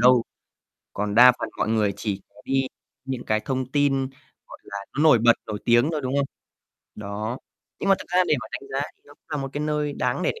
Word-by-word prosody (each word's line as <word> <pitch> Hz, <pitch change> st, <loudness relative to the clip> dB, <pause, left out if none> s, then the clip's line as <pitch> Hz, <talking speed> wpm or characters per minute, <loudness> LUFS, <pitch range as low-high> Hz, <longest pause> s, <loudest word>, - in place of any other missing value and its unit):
đâu, 125 Hz, 0 st, +6 dB, 0.7 s
còn 105 Hz, 0 st, -2 dB
đa 125 Hz, +2 st, +9 dB
phần -, -, -3 dB
mọi -, -, 0 dB
người 110 Hz, -3 st, +2 dB
chỉ 100 Hz, -3 st, -3 dB
có -, -, -16 dB
đi 135 Hz, 0 st, +1 dB, 0.4 s
những 130 Hz, -2 st, -4 dB
cái 110 Hz, 0 st, +1 dB
thông 130 Hz, 0 st, -2 dB
tin, 135 Hz, -2 st, +2 dB, 0.4 s
gọi -, -, -12 dB
là, 100 Hz, -, -7 dB, 0.2 s
nó 150 Hz, -, +2 dB
nổi 155 Hz, -6 st, +7 dB
bật, 120 Hz, +1 st, +6 dB
nổi 105 Hz, -1 st, -4 dB
tiếng 120 Hz, +4 st, +4 dB
thôi, 150 Hz, -, -1 dB
đúng 130 Hz, 0 st, -2 dB
không? 140 Hz, -1 st, +2 dB, 0.7 s
Đó, 105 Hz, +4 st, -4 dB, 0.4 s
nhưng 195 Hz, -, -1 dB
mà 195 Hz, -, +7 dB
thực -, -, -10 dB
ra 180 Hz, +1 st, +4 dB
để -, -, +5 dB
mà 110 Hz, -, -7 dB
đánh 135 Hz, -, -6 dB
giá 135 Hz, +2 st, -1 dB
thì -, -, -43 dB
nó 145 Hz, -, -16 dB
cũng -, -, -46 dB
là 150 Hz, -, -1 dB
một 135 Hz, -1 st, -3 dB
cái 145 Hz, -, -3 dB
nơi 150 Hz, -1 st, -1 dB
đáng -, -, -1 dB
để -, -, +2 dB
để 460 Hz, -, -12 dB
130 Hz, 240 wpm, -24 LUFS, 110-145 Hz, 0.7 s, đa